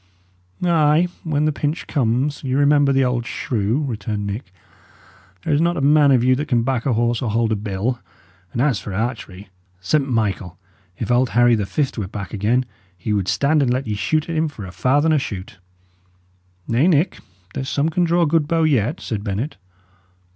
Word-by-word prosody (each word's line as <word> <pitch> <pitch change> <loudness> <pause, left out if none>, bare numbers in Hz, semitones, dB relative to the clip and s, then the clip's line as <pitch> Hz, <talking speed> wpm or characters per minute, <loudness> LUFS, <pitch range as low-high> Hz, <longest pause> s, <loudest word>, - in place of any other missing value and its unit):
"Ay! 165 -1 +3 0.2
when 150 -2 0
the 155 - +2
pinch 150 +2 -3
comes, 135 +2 0
ye 130 -1 -1
remember 145 0 +4
the 135 -1 +3
old 125 -1 0
shoe," 115 +2 -1
returned 105 -3 -3
Nick. 100 0 -5 0.9
"There - - 0
is 145 - +3
not 170 +1 +1
a - - -1
man 145 +1 +5
of 130 -3 +4
you 130 +1 +4
can 130 -5 0
back 130 0 -1
a 130 - +2
horse 120 +1 +1
or 120 - -1
hold 115 +1 +1
a - - +2
bill; 105 +4 -2 0.5
and 120 - 0
as 135 -7 +1
for 100 - -6
archery 105 -4 -4 0.3
St. 135 +9 0
Michael! 100 -6 -1 0.4
if 115 - -3
old 125 +1 +3
Harry 120 0 +6
the 105 -3 0
Fift 130 +4 -1
were 100 - -3
back 100 -2 -7
again, 115 +5 +1 0.3
he 105 +4 -2
would 100 -3 0
stand 145 +9 +2
and 130 -3 +2
let 130 +2 -1
ye 110 - -2
shoot 155 +9 0
at 165 - -3
him 160 0 +1
for 115 -9 -8
a 90 - -8
farthen 140 - +2
a 150 - +3
shoot!" 100 -5 -7 1.1
"Nay, 125 +8 +2
Nick, 170 +1 +2 0.3
there's 130 - -4
some 145 +3 +1
can 175 +2 +1
draw 170 0 +2
a - - +3
good 155 -1 +1
bow 165 0 +1
yet," 145 - +1
said 105 -3 -4
Bennet. 110 +8 -3
125 Hz, 195 wpm, -21 LUFS, 110-150 Hz, 1.1 s, Harry